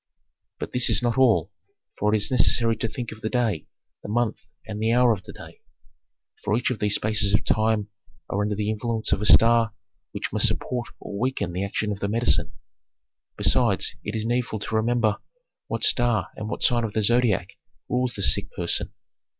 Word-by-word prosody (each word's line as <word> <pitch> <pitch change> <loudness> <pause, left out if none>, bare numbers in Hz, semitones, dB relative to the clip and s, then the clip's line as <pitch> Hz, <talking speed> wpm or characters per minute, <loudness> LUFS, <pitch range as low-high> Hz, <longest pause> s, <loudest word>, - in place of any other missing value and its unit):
"But - - -5
this 125 -1 +3
is 115 - +1
not 120 -1 +1
all, 110 -8 +3 0.5
for 105 +1 +2
it 110 - +3
is 105 +2 -2
necessary 115 -2 +3
to - - -1
think 120 0 -6
of 110 0 -11
the 110 - -2
day, 115 - -1 0.3
the - - -9
month, 120 +1 0 0.2
and 105 -1 -6
the 110 +1 +2
hour 120 0 +4
of 100 - -6
the - - -9
day, - - -13 0.8
for 105 +1 +1
each 125 - 0
of 125 - -4
these 105 -1 +2
spaces 105 -1 +2
of - - -1
time 110 -2 +1 0.4
are 100 - -1
under 105 0 -1
the 105 +1 -1
influence 110 +1 -2
of - - +1
a 105 - +1
star 115 -2 +5 0.4
which - - -5
must - - +3
support 125 -1 -2
or 100 - -7
weaken 125 -8 -1
the 90 +2 -2
action 105 +1 -2
of 100 - -4
the 100 - -2
medicine. 115 +2 +1 0.8
Besides, - - +2
it 105 - -4
is 110 0 -2
needful 120 -1 -1
to 110 +1 -4
remember 110 -1 +1 0.5
what - - -4
star 120 -5 +3
and 105 0 -6
what - - -4
sign 120 -1 +3
of 110 -2 -3
the 110 - 0
Zodiac 120 -5 +2 0.4
rules 125 -1 -1
the 100 - -2
sick 100 +2 +3
person. 85 -1 -1
110 Hz, 200 wpm, -24 LUFS, 105-120 Hz, 0.8 s, star